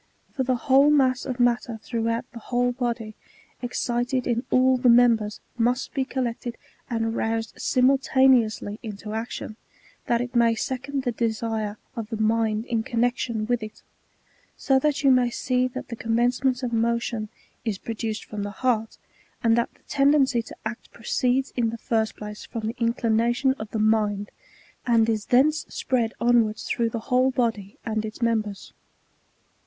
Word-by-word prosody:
For 275 - -2
the 255 0 +1
whole 270 +4 +4
mass 265 -3 +3
of 255 -1 -4
matter 240 -1 +1
throughout 230 +1 -1
the 235 - -9
whole 245 +2 0
body, 235 -3 -3 0.5
excited 245 +1 -1
in 240 0 0
all 255 0 +4
the 250 0 +3
members, 230 -3 +4 0.2
must 245 +3 0
be 265 -2 0
collected,^ 245 -2 -3 0.3
aind 225 -1 -1
roused, 225 0 -1
simul 260 +2 +3
taneously 245 -6 +2
into 210 -2 -7
action, 220 -1 -5 0.5
that 235 - +2
it 245 +1 -4
may 235 -1 +4
second 265 +4 -3
the 245 - 0
desire 220 -2 -2 0.2
of 225 -2 -5
the 225 - -3
mind 220 0 +1
in 230 -3 0
connexion 235 -1 -1
with 240 0 0
it; 215 0 -9 0.7
so 270 -1 +3
that 295 +1 0
you 275 - +6
may 250 -1 +4
see 250 +1 0
that 255 - -7
the 235 - -4
commencement 245 +3 +1
of 240 -1 -2
motion 230 -1 0 0.3
is 220 -5 -2
produced 220 0 -4
from 210 -1 -6
the 205 - -3
heart, 225 0 -1 0.5
and 225 -1 +4
that 235 0 0
the - - -29
tendency 275 -3 +3
to 225 - -11
act 225 +2 -5
proceeds 250 +3 0
in 235 -2 +1
the 230 - -5
first 220 -1 -1
place 210 0 -8
from 225 -2 -6
the 225 +2 -3
in 230 0 +1
clination 235 +3 +2
of 220 - -6
the 220 - -3
mind, 210 -2 +1 0.5
and 230 -2 +3
is 220 -2 -1
thence 295 +5 +3
spread 235 -3 0
onwards 230 -3 +2
through 230 +1 0
the 225 0 -4
whole 255 +1 +4
body 225 -6 -1
and 220 -1 -1
its 215 0 -7
members. 220 -4 -1
235 Hz, 165 wpm, -25 LUFS, 220-250 Hz, 0.7 s, you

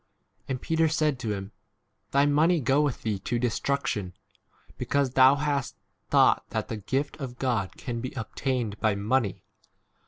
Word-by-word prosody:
And 130 -1 -2
Peter 160 +3 +1
said 155 -4 +1
to 115 -4 -2
him, 95 +1 -7 0.6
Thy 140 +1 +3
money 155 +4 +3
go 135 +2 +2
with 145 -4 -1
thee 105 -3 -1
to 120 - -2
destruction, 115 -5 -1 0.6
because 140 -2 0
thou 130 +1 +6
hast 145 -1 -1 0.3
thought - - +4
that - - -3
the 110 - -3
gift 135 +8 -2
of 130 -4 -6
God 120 -8 -1
can 120 -3 -5
21 - - -5
be 130 - -5
obtained 120 -3 -3
by 110 -2 +2
money. 105 +1 0
130 Hz, 160 wpm, -27 LUFS, 115-140 Hz, 0.6 s, thou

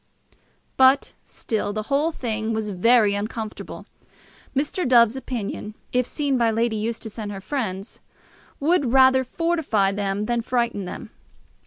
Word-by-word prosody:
But 265 +1 +4
still 210 -2 -3
the 215 0 -3
whole 285 +7 +1
thing 225 -5 -3
was 220 -1 -2
very 215 +2 +4
uncomfortable. 215 +1 -5 0.7
Mr. 290 +4 -1
Dove's 235 -2 +5
opinion, 225 -5 -5 0.2
if 250 -1 +2
seen 280 -4 -1
by 230 -1 +3
Lady 225 0 0
Eustace 220 0 -4
and 210 -2 -4
her 195 - -6
friends, 195 -2 -4 0.6
would 285 -4 +2
rather 260 0 +6
fortify 275 - 0
them 200 0 -2
than 240 +1 0
frighten 235 -4 -1
them. - - -8
230 Hz, 135 wpm, -23 LUFS, 210-260 Hz, 0.7 s, rather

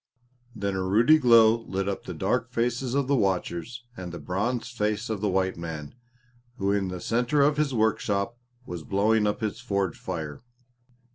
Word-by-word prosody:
Then 100 -2 -2
a 95 - -1
ruddy 115 +12 +5
glow 115 -4 +6
lit 95 -3 -3
up 100 - -3
the 90 - -6
dark 120 +8 0
faces 125 +1 -1
of 140 -1 +2
the 140 - +3
watchers 100 +2 -1
and 90 -4 -7
the 85 - -6
bronzed 115 +7 -2
face 105 +1 -1
of 105 -3 -3
the 105 - +1
white 95 -1 0
man 80 -3 -6 0.6
who 100 -2 0
in 100 -1 +1
the 90 -1 -5
centre 125 +9 +1
of 145 +1 +3
his 150 -2 +1
workshop 110 -2 0 0.3
was 85 -2 -6
blowing 105 +3 +2
up 105 +4 -1
his 110 0 -2
forge 100 -6 -1
fire. 80 -6 -5
105 Hz, 180 wpm, -26 LUFS, 95-120 Hz, 0.6 s, glow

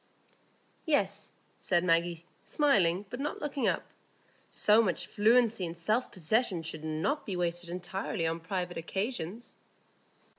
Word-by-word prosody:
"Yes," 205 -9 +1 0.3
said 175 -1 +2
Maggie, 170 -1 +1 0.2
smiling, 200 - +2
but 245 - -5
not 290 +2 -3
looking 285 -2 -1
up; - - +1 0.7
"so 215 +2 +4
much 185 -7 0
fluency 225 -1 +3
and 170 0 -4
self 215 +9 0
possession 185 0 0
should 160 -1 -5
not 160 - -1
be 195 - -4
wasted 175 0 -1
entirely 180 -1 -3
on 165 +1 -1
private 180 +1 -3
occasions." 195 +4 -4
185 Hz, 125 wpm, -30 LUFS, 170-225 Hz, 0.7 s, so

